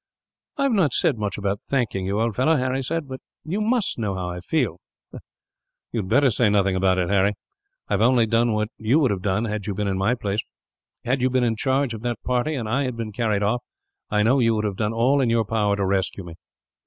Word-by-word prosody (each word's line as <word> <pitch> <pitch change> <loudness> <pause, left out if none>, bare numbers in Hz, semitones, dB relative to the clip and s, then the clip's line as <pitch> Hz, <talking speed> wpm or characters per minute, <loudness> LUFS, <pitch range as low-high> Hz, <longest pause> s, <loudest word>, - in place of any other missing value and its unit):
"I 280 - 0
have 275 - +2
not 180 - +2
said 135 -8 +1
much 105 -2 -2
about 100 0 -2
thanking 110 -8 -1
you, 100 +2 -1
old 115 -2 0
fellow," 155 +6 +3
Harry 130 -1 0
said, 155 +3 -3
"but 130 0 -7 0.2
you 185 +7 -2
must 225 - 0
know 105 -4 -1
how 90 -1 -3
I 90 - -6
feel." 105 - -1 1.1
"You 115 - -2
had 95 - -7
better 135 +2 +4
say 115 0 +2
nothing 100 -2 +2
about 95 0 +2
it, 90 -2 0
Harry. 100 +1 +2 0.5
I - - -2
have 100 - +1
only 120 0 +4
done 115 +1 +2
what 105 0 -1
you 110 +6 +2
would 140 -8 +3
have 95 -2 -2
done, 100 +4 0
had 105 -2 -4
you 100 - -2
been 105 +1 -1
in 95 -1 -1
my 105 +6 +2
place. 105 -3 -2 0.6
Had 125 +2 0
you 130 - +3
been 130 0 +1
in 115 -2 +1
charge 130 +2 0
of 110 - -7
that 120 0 -3
party, 125 +5 0
and 120 -5 -3
I 135 +5 0
had 125 -2 -4
been 115 -2 -4
carried 105 -2 0
off, 115 +4 +1 0.5
I 105 0 +2
know 130 +5 +3
you 115 -2 +3
would 110 0 -1
have 100 -2 -2
done 105 +2 -1
all 125 +5 +2
in 125 - +1
your 115 -1 +2
power 105 -1 +1
to 100 -1 -1
rescue 95 0 -1
me. 85 -1 -9
115 Hz, 245 wpm, -23 LUFS, 100-130 Hz, 1.1 s, better